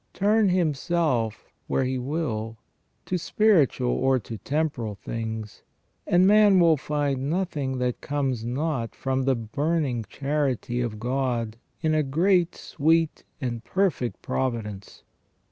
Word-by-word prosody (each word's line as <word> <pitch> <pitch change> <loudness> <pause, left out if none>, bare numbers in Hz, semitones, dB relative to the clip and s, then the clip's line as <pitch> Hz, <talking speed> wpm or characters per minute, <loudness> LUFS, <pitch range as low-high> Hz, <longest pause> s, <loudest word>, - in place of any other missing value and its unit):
Turn 210 +1 +3
himself 155 - 0 0.2
where - - +1
he 130 0 -1
will, 125 -6 -3 0.5
to 180 - -1
spiritual 160 - +3
or 130 0 +2
to 115 -2 -7
temporal 140 - -2
things, 110 0 -5 0.5
and 180 +1 +5
man 205 -1 +6
will 165 -2 +6
find 140 -2 -1
nothing 155 -7 -1
that 125 -1 -1
comes 135 -5 -1
not 125 0 -2
from 130 -1 -1
the 135 -1 +3
burning 135 +2 -1
charity 135 -3 -1
of 110 -3 -3
God 120 -2 -1 0.3
in 160 -1 +1
a 155 - +3
great, 170 +5 +2
sweet, 160 +1 +1 0.2
and 120 -4 -3
perfect 180 -8 -1
providence. 110 -7 -3
135 Hz, 125 wpm, -25 LUFS, 120-165 Hz, 0.5 s, man